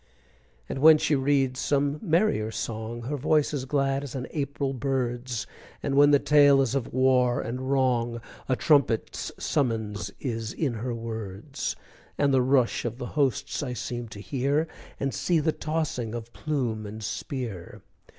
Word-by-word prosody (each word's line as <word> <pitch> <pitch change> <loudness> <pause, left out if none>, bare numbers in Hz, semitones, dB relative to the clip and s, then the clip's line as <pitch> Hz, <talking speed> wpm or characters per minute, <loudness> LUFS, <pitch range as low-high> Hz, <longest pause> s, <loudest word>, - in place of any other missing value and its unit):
And - - -4
when 155 +2 +8
she 150 - +1
reads 135 -2 +2
some 145 +1 +1
merrier 170 - +2
song, 110 +1 -4
Her 145 +5 -3
voice 150 +2 +2
is 135 -3 -2
glad 135 0 0
as 140 -1 -7
an 125 -1 -3
April 140 -2 -2
bird's, 125 -2 -2 0.4
And 140 - -1
when 145 +1 +6
the 145 - +6
tale 145 -1 +5
is 135 -2 +1
of 135 -4 -2
war 125 -1 +3
and 130 +3 -4
wrong, 120 -3 +1 0.3
A 130 - +3
trumpet's 140 -6 +2
summons 110 - -1
is 115 -4 -3
in 145 -7 -1
her 120 +2 -3
words, 115 +2 -5 0.4
And 140 -1 +2
the 130 - +5
rush 130 -2 +2
of 120 0 -3
the 125 - -5
hosts 140 -7 0
I 130 -4 -3
seem 120 0 -4
to 105 -2 -10
hear, 140 +7 0 0.3
And 135 -1 -1
see 175 -2 +1
the 160 +1 +2
tossing 150 -9 -2
of 120 0 -7
plume 120 -8 -2
and 110 +1 -8
spear! 110 -5 -5
130 Hz, 160 wpm, -27 LUFS, 115-145 Hz, 0.4 s, when